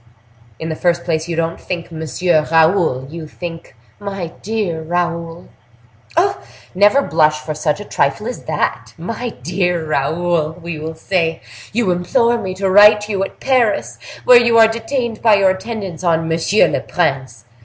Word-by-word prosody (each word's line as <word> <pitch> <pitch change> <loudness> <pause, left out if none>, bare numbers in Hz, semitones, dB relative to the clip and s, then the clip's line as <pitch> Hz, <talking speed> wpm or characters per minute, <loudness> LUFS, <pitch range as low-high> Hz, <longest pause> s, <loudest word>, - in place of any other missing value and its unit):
"In 160 - -5
the 160 - -3
first 175 +1 0
place, 160 -1 -1
you 170 - -3
don't 165 0 -2
think, 175 -2 -5
Monsieur 160 0 0
Raoul; 160 -5 +3
you 165 -1 -7
think, 165 -2 -8 0.2
My 195 -4 -5
dear 205 -6 -2
Raoul." 170 0 -3 0.7
"Oh!—" 390 +3 +2 0.3
"Never 205 +9 +4
blush 155 - +2
for 155 0 -4
such 155 +3 -1
a 205 - -7
trifle 140 +6 0
as 245 - -6
that! - - -2
'My 230 +8 -4
dear 175 0 -1
Raoul,' 160 +2 0
we 170 -2 -6
will 160 +1 -6
say—'You 165 - -2
implore 230 +7 +1
me 185 -2 -4
to 195 +1 -1
write 210 +2 +6
you 195 -2 0
at 195 - -7
Paris, 250 -5 +1 0.3
where 245 -1 +8
you 235 -1 +3
are 225 -1 +8
detained 230 +1 -3
by 220 -2 +5
your 195 -2 +4
attendance 190 -3 -6
on 165 -2 +2
M. 165 0 -1 0.3
le - - 0
Prince. 135 -9 -2
175 Hz, 160 wpm, -17 LUFS, 160-205 Hz, 0.7 s, where